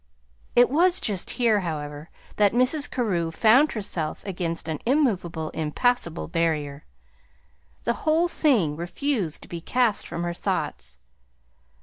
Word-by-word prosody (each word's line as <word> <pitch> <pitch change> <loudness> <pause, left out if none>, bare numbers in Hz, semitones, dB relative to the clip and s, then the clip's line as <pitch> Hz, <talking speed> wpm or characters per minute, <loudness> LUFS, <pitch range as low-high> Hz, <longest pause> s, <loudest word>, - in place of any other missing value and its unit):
It 245 +1 +5
was 350 +5 +4
just 200 -6 -1
here, 230 -4 +2
however, 150 -3 -5 0.3
that 205 -1 +4
Mrs. 255 +5 +3
Carew 185 -10 -1
found 230 - +4
herself 180 -7 -3
against 170 -4 -3
an 155 -2 -3
immovable, 195 - 0
impassable 170 +3 -1
barrier: 155 -4 -1 1.0
the 235 - +1
whole 320 +3 +2
thing 235 - +2
refused 175 - -2
to - - -11
be 170 -1 -6
cast 240 +1 +1
from 170 - -4
her 175 0 -2
thoughts. 60 - -3
190 Hz, 125 wpm, -25 LUFS, 165-245 Hz, 1.0 s, It